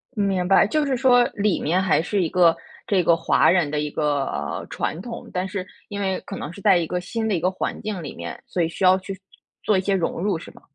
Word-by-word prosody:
明 195 -3 0
白， 195 +1 +5
就 305 +6 +1
是 275 -2 0
说 245 -1 +5
里 205 -1 +1
面 180 +5 +1
还 180 -4 +2
是 195 +3 -1
一 165 - -1
个 170 -2 +4 0.3
这 195 -5 +2
个 165 +1 +4
华 165 - +3
人 175 -5 +3
的 150 - -1
一 150 0 -2
个 145 -2 -2
传 160 - -3
统， 230 +2 -8
但 185 +1 -1
是 190 -1 -4 0.2
因 205 -1 -5
为 190 -1 -1
可 195 - -6
能 150 - -6
是 200 - -11
在 195 -4 +5
一 170 - 0
个 180 +2 -2
新 220 +5 -3
的 210 - 0
一 - - 0
个 180 +3 +1
环 185 - -4
境 210 -4 -4
里 145 - -6
面， 85 0 -7
所 180 - -2
以 165 - +1
需 180 - -5
要 185 0 +6
去 190 0 -8 0.4
做 210 -3 +2
一 - - +1
些 195 +1 0
融 170 -2 -1
入 195 -4 0
是 - - -11
吗？ - - -19
185 Hz, 280 characters per minute, -23 LUFS, 170-205 Hz, 0.4 s, 要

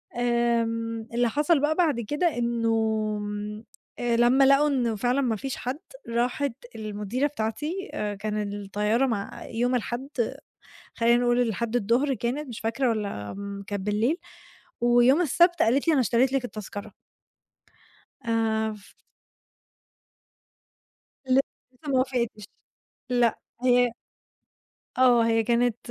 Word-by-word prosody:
آمم، 230 -1 0
اللي 240 0 +2
حصل 295 +4 +2
بقى 300 +2 +1
بعد 310 -9 +2
كده 295 +6 -1
إنه 235 -1 0 1.3
آآ 240 -1 +1
لمّا 250 +3 +5
لقوا 275 +2 +5
إن 245 -6 0
فعلًا 250 +5 +1
ما 235 -4 +1
فيش 265 +5 -4
حد، 260 +5 -4 0.3
راحت 245 +3 0 0.2
المديرة 215 +5 -2
بتاعتي 295 - -4 0.3
كان 210 -1 -2
الطيارة 210 +5 0
مع 205 -6 -4
يوم 245 +2 0
الحد، 245 +3 -3 0.9
خلينا 235 +1 +3
نقول 240 0 +3
الحد 235 0 -1
الضهر 245 +6 +1
كانت 250 +5 -3
مش 230 - -7
فاكرة 235 +4 0
والّا 200 - -3 0.3
كانت 200 -2 -4
بالليل، 220 +10 +1 0.6
ويوم 240 +5 +5
السبت 345 +3 +3
قالت 270 +8 +2
لي: - - +6
"أنا 270 - +3
اشتريت 245 +4 +2
لِك 270 -2 0
التذكرة." 210 -2 -8 1.3
آآ 230 - -1 0.4
ف 205 -1 -18 2.3
ل 255 - +4 0.4
لِسه 290 +4 -13
ما 260 - +3
وافقتش، 240 -5 -1 0.7
لأ، 240 -2 +2 0.2
هي 245 -1 +4 1.1
آه، 245 -2 +6
هي 225 0 +3
كانت 240 0 +2
240 Hz, 120 wpm, -26 LUFS, 225-265 Hz, 2.3 s, لي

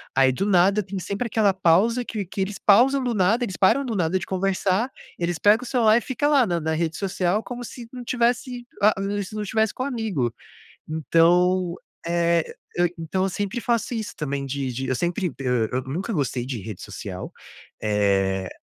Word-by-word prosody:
aí 135 -1 +5
do 160 +10 -2
nada, 200 +1 +4
tem 195 0 -6
sempre 200 +6 -3
aquela 205 -3 +2
pausa 195 +7 +3
que 215 -3 -3
que 185 - -8
eles 195 +1 -2
pausam 255 +6 +4
do 245 - 0
nada. 215 +4 +2
Eles 190 -6 -4
param 270 +8 +3
do 235 -4 -3
nada 180 -1 +1
de 185 - -5
conversar. 195 +4 0 0.3
Eles 170 -1 -1
pegam 210 +6 +4
o - - -7
celular 225 -3 +4
e - - +1
fica 260 +3 -2
lá 280 -4 +4
na 175 -2 0
na 160 +1 -1
rede 160 0 -1
social, 195 +1 0
como 245 0 -6
se 240 +1 -9
não 250 -1 -7
tivesse. 245 0 0 0.2
Ah, 210 +1 +6 0.3
se 205 +3 -9
não 210 - -2
tivesse 220 +1 0
com 255 - -3
amigo. 220 - -1 0.5
Então, 170 +3 +3 0.3
eh, 170 -1 +2 0.3
eu 175 0 +2
então 165 +3 -2
eu 195 - +1
sempre 205 +5 -3
faço 235 +1 0
isso 220 -2 -4
também 140 -2 -3
de 135 -1 -3
de 130 +2 -3
eu 130 - 0
sempre, 175 - -1
eh, 125 -4 0
eu 130 +1 0
nunca 170 - -4
gostei 135 - -1
de 130 -4 -4
rede 100 -1 -8
social, - - -7 0.5
eh, 95 -3 +1
190 Hz, 195 wpm, -24 LUFS, 160-220 Hz, 0.5 s, Ah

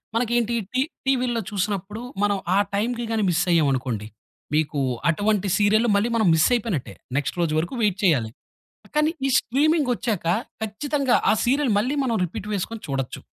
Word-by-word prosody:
మనకేంటి 240 0 +1 0.2
టీ 255 - +2 0.2
టీవీ‌లో 250 -3 +1
చూస్తున్నప్పుడు 205 +1 -3 0.2
మనం 205 -1 +2 0.2
ఆ - - +4 0.2
టైం‌కి 235 +4 -1
గాని 220 -1 +1
మిస్సయ్యామనుకోండి, 135 - +1 0.5
మీకు 150 -1 +1 0.3
అటువంటి 205 +3 +1
సీరియల్లు 215 +3 +3
మళ్ళీ 210 +4 +2
మనం 220 -5 +2
మిసయిపోయినట్టే. 200 - +1 0.2
నెక్స్ట్ 145 - -1
రోజు 160 -3 0
వరకు 170 +8 -3
వెయిట్ 205 -3 +2
చేయాలి. 125 -12 +2 0.6
కానీ 300 +1 +3 0.2
ఈ - - 0
స్ట్రీమింగొచ్చాక 255 - 0 0.4
ఖచ్చితంగా 270 +4 0 0.2
ఆ - - +4
సీరియలు 265 0 +2
మళ్ళీ 255 +8 0
మనం 235 -4 0
రిపీట్ 190 +4 -7
వేసుకొని 210 +3 -3
చూడొచ్చు. 135 -2 -3
210 Hz, 140 wpm, -23 LUFS, 175-240 Hz, 0.6 s, ఆ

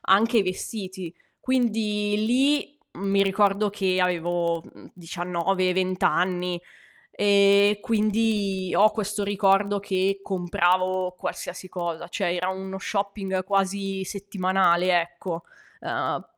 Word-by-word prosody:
anche 225 +3 +4
vestiti. 185 -2 -5 0.3
Quindi 215 -5 0
lì, 280 +4 +1 0.3
mi 195 0 +3
ricordo 200 +1 +2
che 190 -2 0
avevo, 175 -1 0
mhmm, - - -16
19, 180 +2 -1
20 185 0 -1
anni, 180 -1 +1 0.5
e 200 0 +4
quindi 210 -4 0
ho 215 +1 +6
questo 210 -1 -3
ricordo 200 0 +2
che 195 0 0
compravo 185 0 0
qualsiasi 185 +1 -6
cosa, 170 -2 -5
cioè 180 -1 -1
era 180 +1 -1
uno 190 0 -5
shopping 195 -2 -2
quasi 195 0 -1
settimanale, 185 -2 +1
ecco. 175 0 -6 0.4
Ehm, - - -2
190 Hz, 105 wpm, -25 LUFS, 180-205 Hz, 0.5 s, ho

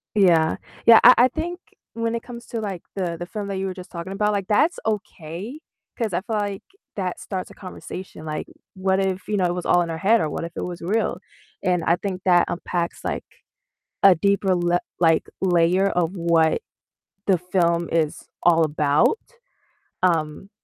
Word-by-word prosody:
Yeah. 170 -6 +4 0.3
Yeah, 230 -1 +9
I 250 - +10
I 245 - +6
think 335 +7 -4 0.3
when 230 0 -2
it 235 - -2
comes 240 -1 -10
to, 230 - -4
like, 195 -5 -5
the 175 -4 -2
the 175 - -4
film 205 +2 -5
that 195 -1 -3
you 190 - -2
were 190 - -3
just 185 -1 -11
talking 175 +2 -6
about, 210 +1 +1
like, 200 -2 -2
that's 305 +11 +2
okay 205 - -4 0.4
'cause 225 -6 -2
I 175 - 0
feel 220 +2 -4
like 205 -2 -2 0.3
that 185 -3 -3
starts 185 -2 -5
a - - -12
conversation. 185 -3 -9
Like, 155 -1 -4 0.3
what 190 0 0
if, 190 -1 -2
you 210 - 0
know, 185 - +2
it 175 - +1
was 180 -1 -5
all 175 - +4
in 170 - -2
her 165 - -3
head 215 +8 +4
or 155 - 0
what - - -4
if 170 - -5
it - - -4
was 175 -1 -6
real? 205 +7 0 0.4
And 180 -2 +1
I 170 - +3
think 185 0 -4
that 175 -2 +5
unpacks, 175 0 -3
like, - - -3 0.8
a 195 -2 +9
deeper 195 +2 +2
le 175 0 +2 0.2
like, 165 -2 +3
layer 180 +1 +3
of 175 -2 0
what 170 -3 +2 0.7
the 190 -2 +4
film 170 -1 +1
is 160 -2 -1 0.2
all 165 -1 +5
about. 150 - +2 0.9
Um, 165 +1 0
185 Hz, 190 wpm, -23 LUFS, 170-200 Hz, 0.9 s, I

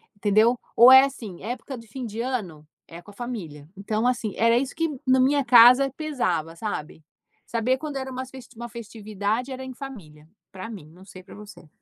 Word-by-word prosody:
entendeu? 215 +4 +2 0.2
Ou 245 +2 +8
é 265 +1 +9
assim, 225 -10 -8
época 245 +4 -6
do 230 -2 -12
fim 250 +3 -7
de 225 +1 -5
ano, 190 - -5 0.2
é 170 +1 -11
com - - -17
a - - -18
família. 180 -12 -7
Então 215 +4 -2
assim, 235 -5 -1
era 230 +1 +3
isso 270 +1 -4
que 325 -2 -2
na 260 0 +4
minha 280 +2 +3
casa 250 +3 +7
pesava, 180 - -2
sabe? 160 -6 -6 0.4
Saber 235 +3 0
quando 305 -2 -6
era 265 0 -5
umas 260 0 -6
festi 260 -2 -13
uma 235 +1 -8
festividade 215 +2 -4
era 260 0 -6
em 260 - -8
família, 190 - -11 0.2
pra 190 +4 -8
mim, 190 -9 -10
não 180 +3 -17
sei 185 -2 -13
pra 190 - -15
você. 210 -5 -13
230 Hz, 200 wpm, -24 LUFS, 200-260 Hz, 0.4 s, é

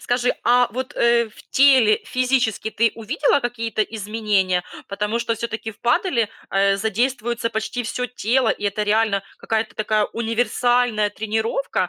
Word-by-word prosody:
Скажи, 245 0 0
а 245 +1 +4
вот, 260 +4 -5
э, 235 0 +3
в 210 - -17
теле 260 -6 +5
физически 250 -4 0
ты 230 0 +1
увидела 280 +5 +1
какие-то 230 -3 -2
изменения? 205 -4 -1 0.3
Потому 210 +3 -2
что 235 -1 -1
всё-таки 225 0 -5
в 210 - -18
паделе 240 - +1 0.5
задействуется 230 +3 -1
почти 220 +3 -3
всё 250 +2 -3
тело, 245 0 0
и - - -3
это 205 +1 -1
реально 210 -1 +1 0.2
какая-то 225 0 -2
такая 215 0 +1
универсальная 235 -1 +1
тренировка. 220 -1 -2
230 Hz, 135 wpm, -21 LUFS, 215-245 Hz, 0.5 s, теле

